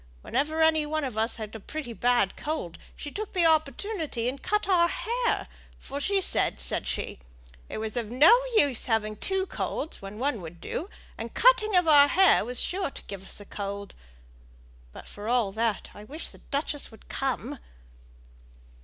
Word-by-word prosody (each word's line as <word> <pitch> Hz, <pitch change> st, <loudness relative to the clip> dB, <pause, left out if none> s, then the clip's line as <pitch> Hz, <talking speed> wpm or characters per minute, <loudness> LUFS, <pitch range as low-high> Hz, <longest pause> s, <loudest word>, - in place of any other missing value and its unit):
Whenever 310 Hz, +4 st, +1 dB
any 315 Hz, -1 st, +4 dB
on 310 Hz, +1 st, -2 dB
us 225 Hz, -2 st, -1 dB
had 215 Hz, -3 st, -6 dB
got 220 Hz, -, -7 dB
a -, -, -12 dB
pretty 270 Hz, +2 st, -6 dB
bad 240 Hz, -4 st, +2 dB
cold, 295 Hz, -, -4 dB, 0.2 s
she 290 Hz, -, -7 dB
took 430 Hz, +4 st, -5 dB
the 355 Hz, -2 st, +3 dB
opportunity 315 Hz, -, +1 dB
and 265 Hz, +2 st, -3 dB
cut 420 Hz, -1 st, 0 dB
our 350 Hz, -3 st, +5 dB
hair; 475 Hz, +6 st, -1 dB, 0.3 s
for 280 Hz, +1 st, -6 dB
she 395 Hz, +7 st, +1 dB
said, 380 Hz, -, +1 dB
said -, -, +1 dB
she, -, -, -3 dB, 0.5 s
it -, -, -5 dB
was 220 Hz, -1 st, -4 dB
of 235 Hz, -3 st, -2 dB
no 270 Hz, -, +7 dB, 0.3 s
use 280 Hz, -, +3 dB
having 215 Hz, -2 st, 0 dB
two 380 Hz, -, -1 dB
colds 320 Hz, -3 st, -4 dB
when 195 Hz, +1 st, -8 dB
one 255 Hz, -3 st, -1 dB
would 170 Hz, 0 st, -9 dB
do 350 Hz, -, -4 dB, 0.3 s
and 230 Hz, +1 st, -6 dB
cutting 435 Hz, -4 st, +5 dB
of 355 Hz, -2 st, +4 dB
our 290 Hz, -2 st, +8 dB
hair 380 Hz, +5 st, +5 dB
was 245 Hz, +2 st, -5 dB
sure 375 Hz, -3 st, -1 dB
to -, -, -11 dB
give 195 Hz, -2 st, -8 dB
us 195 Hz, -, -4 dB
a 205 Hz, -, -10 dB
cold. 200 Hz, 0 st, -5 dB, 1.0 s
But, -, -, -11 dB
for 205 Hz, +1 st, -8 dB
all 235 Hz, -4 st, +2 dB
that, 220 Hz, 0 st, -1 dB
I 205 Hz, -, -11 dB
wish 295 Hz, +9 st, -7 dB
the -, -, -15 dB
duchess 290 Hz, 0 st, -3 dB
would 220 Hz, -, -17 dB
come." 270 Hz, 0 st, -2 dB
275 Hz, 180 wpm, -27 LUFS, 220-320 Hz, 1.0 s, our